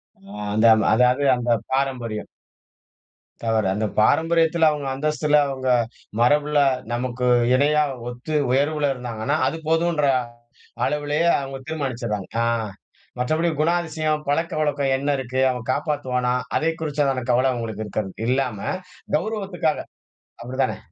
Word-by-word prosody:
அ 195 - -13 0.2
அந்த 110 +2 +4 0.3
அதாது 125 +4 +3
அந்த 120 0 -3 0.2
பாரம்பரியம். 125 -6 -2 1.2
தவறு. 110 -2 +1
அந்தப் 105 +1 -3
பாரம்பரியத்துல 165 +4 +3
அவங்க 145 -2 -4
அந்தஸ்துல 150 +1 +2
அவங்க 130 -1 -4 0.5
மரபுல 145 +4 +3 0.3
நமக்கு 125 +1 -2 0.3
இணையா 150 +3 +3 0.3
ஒத்து 125 +6 -5 0.2
உயர்வுல 145 +2 +1
இருந்தாங்கன்னா, 125 +2 -3
அது 165 - -2
போதுன்ற 165 -2 +2 0.8
அளவுலயே 150 +3 0
அவங்க 135 -1 -6
தீர்மாணிச்சிறாங்க. 120 -9 -3
அ - - +1 0.7
மற்றபடி 155 +7 +1
குணாதிசயம், 155 -2 0
பழக்கவழக்கோ 155 -2 0
என்ன 140 +2 -2
இருக்கு, 130 0 -3
அவன் 125 0 -6
காப்பாத்துவானா? 130 -4 -1 0.2
அதைக் 160 +1 -1
குறிச்சுதானே 140 -4 0
கவல 130 +2 +3
அவங்களுக்கு 110 -3 -4
இருக்காது. 105 -1 -3 0.2
இல்லாம 125 -4 0 0.6
கௌரவத்துக்காக. 185 -4 -2 0.7
அப்டிதானே? 130 +2 -1
140 Hz, 110 wpm, -23 LUFS, 125-155 Hz, 1.2 s, அந்த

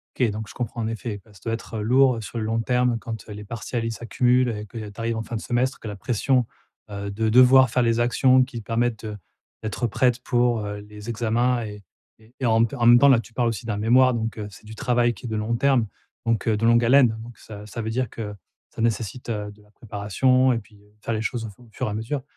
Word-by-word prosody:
OK 125 -4 +2
donc 110 +1 -5
je - - -10
comprends, 120 -1 -4
en 110 - -1
effet, 115 -2 -5
bah 110 - -20
ça 100 - -18
doit 115 - -1
être, 115 -1 -6
heu, - - -2
lourd, 130 +3 +4
heu, - - -5
sur 110 +2 -8
le 110 - -2
long 115 +1 0
terme 125 0 +1
quand, 110 -2 -7
heu, - - -7
les 105 0 -8
partiels 115 +2 -4
ils 115 - -2
s'accumulent 125 +3 +1
et 105 -1 -5
qu'il 115 +2 -8
y 110 - -6
a 105 - -8
tu 100 - -11
arrives 115 0 -1
en 110 - -2
fin 115 +1 -5
de 110 - -3
semestre, 125 +2 -1
que 110 - -7
la 105 - -6
pression, 125 +3 +1 0.4
heu, 100 0 -5
de 110 +2 -1
devoir 130 +2 +7
faire 125 - +2
les 115 -1 +2
actions 130 +2 +4
qui 125 -2 -8
te - - -14
permettent, 115 -1 -1
heu, 105 -1 -5 0.5
d'être 110 +3 -2
prête 125 +3 +1
pour, 120 -2 +1
heu, 105 0 -5
les 105 +1 -11
examens 120 +2 +1
et 105 -1 -8 0.4
et 110 +3 -23
et 125 - 0
en 115 0 +4
en 120 0 -1
même 120 0 +8
temps, 140 +3 +6
là, 130 -4 +6
tu 115 - -15
parles 120 +1 +1
aussi 115 -3 -4
d'un 105 -3 -2
mémoire 125 +4 +4
donc, 115 -1 -3
heu, 105 - -4
c'est 100 - -15
du 110 - -9
travail 120 -1 +1
qui 100 - -16
est - - -4
de 110 - -2
long 110 +2 -1
terme, 130 -3 +2 0.4
donc 115 -2 0
heu, 110 - +3
de 115 - +1
longue 115 0 +5
haleine, 125 -2 +5
donc 115 -1 -12
ça 105 -1 -10
ça 110 +2 -6
veut 110 - -3
dire 125 0 -1
que 105 -2 -6 0.4
ça - - -5
nécessite, 115 +2 -2
heu, 105 -2 -3
de 105 0 -20
la 105 - -24
préparation 120 +5 +1
et 115 - 0
puis, 105 0 -15
heu, 105 0 -25
faire 115 - -2
les 110 - -2
choses 115 +1 -3
au - - -8
fu 105 +5 -18
fur 130 +1 -3
et - - -3
à - - -4
mesure. 115 +6 -3
115 Hz, 280 wpm, -24 LUFS, 110-125 Hz, 0.5 s, même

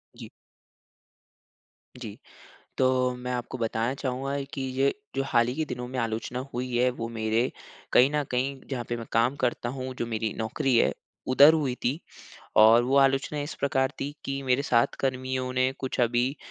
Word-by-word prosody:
जी। - - -10 1.7
जी। - - -8 0.6
तो 130 - +3 0.3
मैं 125 0 -5
आपको 125 +1 -4
बताना 115 +2 -1
चाहूँगा 135 +1 -3
कि 135 - -4
ये, 135 +1 +1 0.2
जो 135 - 0
हाल 120 -2 +3
ही 125 - -3
के 155 0 -1
दिनों 125 -3 -5
में 130 +1 -6
आलोचना 115 +2 -3
हुई 125 0 -3
है 125 +1 +3
वो 115 - -2
मेरे 115 +2 0 0.4
कहीं 130 +3 +6
न 150 -1 +1
कहीं 130 +2 -1
जहाँ 125 -3 -3
पे 120 - -1
मैं 115 - -7
काम 120 +4 +2
करता 120 -1 0
हूँ, 130 0 -5
जो 120 - -2
मेरी 110 -2 -2
नौकरी 115 +3 0
है - - +4 0.4
उधर 145 +4 +8
हुई 140 -6 0
थी। 135 +7 0 0.6
और 110 +2 +7
वो 135 +2 +1
आलोचना 135 +2 +2
इस 145 +3 -5
प्रकार 130 -1 +1
थी 145 +1 -3
कि 135 0 -3
मेरे 130 +1 +1
साथ 120 -4 +2
कर्मियों 130 -1 -2
ने 130 0 +2
कुछ 130 -1 -3
अभी 120 +4 +1
130 Hz, 180 wpm, -27 LUFS, 120-135 Hz, 1.7 s, उधर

